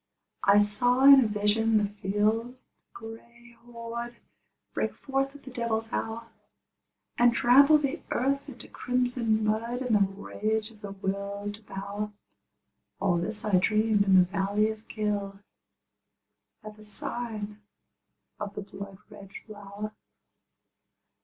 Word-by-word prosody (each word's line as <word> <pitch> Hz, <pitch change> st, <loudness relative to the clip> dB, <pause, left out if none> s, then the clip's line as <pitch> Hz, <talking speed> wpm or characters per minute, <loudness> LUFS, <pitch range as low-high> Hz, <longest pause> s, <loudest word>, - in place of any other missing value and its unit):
I 200 Hz, +1 st, +6 dB
saw 245 Hz, +5 st, +2 dB
in 275 Hz, -1 st, +10 dB
a -, -, +1 dB
vision 215 Hz, +2 st, +2 dB
the 210 Hz, -, +2 dB
field 210 Hz, +4 st, -1 dB, 0.3 s
gray 235 Hz, +1 st, -12 dB
horde 235 Hz, 0 st, -7 dB, 0.6 s
Break -, -, -2 dB
forth 270 Hz, 0 st, -2 dB
at 285 Hz, -, -13 dB
the 260 Hz, -, -10 dB
devil's 225 Hz, -2 st, -2 dB
hour, 230 Hz, +1 st, -3 dB, 0.9 s
And 240 Hz, 0 st, +5 dB
trample 280 Hz, +6 st, +6 dB
the 295 Hz, +2 st, -2 dB
earth 275 Hz, +3 st, 0 dB
into 250 Hz, -, -11 dB
crimson 245 Hz, -3 st, 0 dB
mud 230 Hz, +4 st, -1 dB
In 250 Hz, -3 st, 0 dB
the 210 Hz, -, +5 dB
rage 210 Hz, +3 st, -1 dB
of 215 Hz, -2 st, -19 dB
the 200 Hz, -2 st, -7 dB
Will 200 Hz, +1 st, -4 dB
to 205 Hz, +2 st, -11 dB
Power, 200 Hz, +1 st, -5 dB, 0.9 s
All 190 Hz, -3 st, +2 dB
this 210 Hz, +5 st, -3 dB
I 200 Hz, -4 st, +4 dB
dreamed 215 Hz, +1 st, +2 dB
in 195 Hz, -1 st, +4 dB
the 185 Hz, -, +8 dB
valley 200 Hz, +3 st, 0 dB
of 220 Hz, 0 st, -11 dB
Kyll, 205 Hz, -2 st, -2 dB, 1.3 s
At 215 Hz, 0 st, -10 dB
the 215 Hz, -, -14 dB
sign 210 Hz, 0 st, -4 dB, 0.8 s
of 205 Hz, -1 st, -5 dB
the 205 Hz, -, -5 dB
blood 195 Hz, -1 st, -9 dB
red 200 Hz, -2 st, -12 dB, 0.2 s
flower. 205 Hz, 0 st, -8 dB
215 Hz, 135 wpm, -28 LUFS, 205-235 Hz, 1.3 s, in